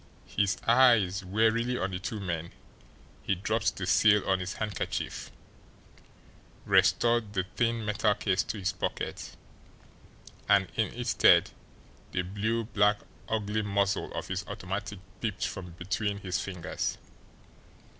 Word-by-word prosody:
His 95 Hz, +11 st, 0 dB
eyes 115 Hz, -6 st, +5 dB
warily 110 Hz, +5 st, +1 dB
on 95 Hz, -2 st, -2 dB
the 90 Hz, -, -3 dB
two 105 Hz, +3 st, -4 dB
men, 85 Hz, -4 st, -4 dB, 0.7 s
he 100 Hz, -, 0 dB
dropped 110 Hz, +4 st, 0 dB
the 95 Hz, -, -4 dB
seal 105 Hz, +3 st, +4 dB
on 95 Hz, -1 st, +2 dB
his 90 Hz, +2 st, -4 dB
handkerchief, 105 Hz, -3 st, -3 dB, 1.4 s
restored 120 Hz, -3 st, +3 dB
the 95 Hz, -3 st, +1 dB
thin 115 Hz, -2 st, 0 dB
metal 105 Hz, 0 st, +2 dB
case 100 Hz, -2 st, +1 dB
to -, -, -4 dB
his 95 Hz, -1 st, -1 dB
pocket 95 Hz, -, -4 dB, 1.1 s
and 100 Hz, -3 st, +4 dB
in -, -, 0 dB
its -, -, -2 dB
stead -, -, +5 dB, 0.6 s
the 90 Hz, -, 0 dB
blue 110 Hz, +5 st, -1 dB
black 105 Hz, -2 st, +2 dB, 0.3 s
ugly 110 Hz, -1 st, 0 dB
muzzle 100 Hz, -1 st, 0 dB
of -, -, -4 dB
his -, -, -2 dB
automatic 100 Hz, +2 st, -5 dB, 0.2 s
peeped 105 Hz, -4 st, -2 dB
from 90 Hz, -3 st, -6 dB
between 100 Hz, +4 st, -2 dB
his 95 Hz, -3 st, -2 dB
fingers. 90 Hz, -3 st, -3 dB
100 Hz, 130 wpm, -29 LUFS, 95-110 Hz, 1.4 s, eyes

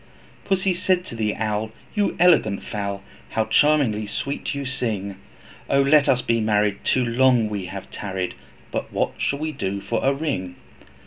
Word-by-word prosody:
Pussy 190 Hz, -1 st, +1 dB
said 180 Hz, 0 st, +1 dB
to 120 Hz, -, -8 dB
the 105 Hz, -2 st, -1 dB
Owl, 110 Hz, 0 st, -1 dB, 0.2 s
'You 205 Hz, -2 st, +1 dB
elegant 165 Hz, -, +4 dB
fowl, 100 Hz, -1 st, -4 dB, 0.3 s
How 110 Hz, -, 0 dB
charmingly 115 Hz, -4 st, +3 dB
sweet 140 Hz, +6 st, -3 dB
you 140 Hz, -1 st, -3 dB
sing. 105 Hz, -7 st, -3 dB, 0.5 s
O 140 Hz, -, +3 dB
let 140 Hz, +1 st, +5 dB
us 125 Hz, -1 st, +3 dB
be 115 Hz, 0 st, +1 dB
married, 105 Hz, -2 st, +1 dB
too 130 Hz, -1 st, +2 dB
long 125 Hz, 0 st, +4 dB, 0.2 s
have 95 Hz, +2 st, -7 dB
we -, -, -26 dB
tarried, 95 Hz, -3 st, -3 dB, 0.4 s
But -, -, -3 dB
what -, -, 0 dB
shall 140 Hz, -, 0 dB
we 155 Hz, +2 st, -2 dB
do 100 Hz, -8 st, -3 dB
for 110 Hz, +3 st, -2 dB
a 135 Hz, -, +4 dB
ring?' 135 Hz, -, -3 dB
115 Hz, 170 wpm, -23 LUFS, 105-140 Hz, 0.5 s, let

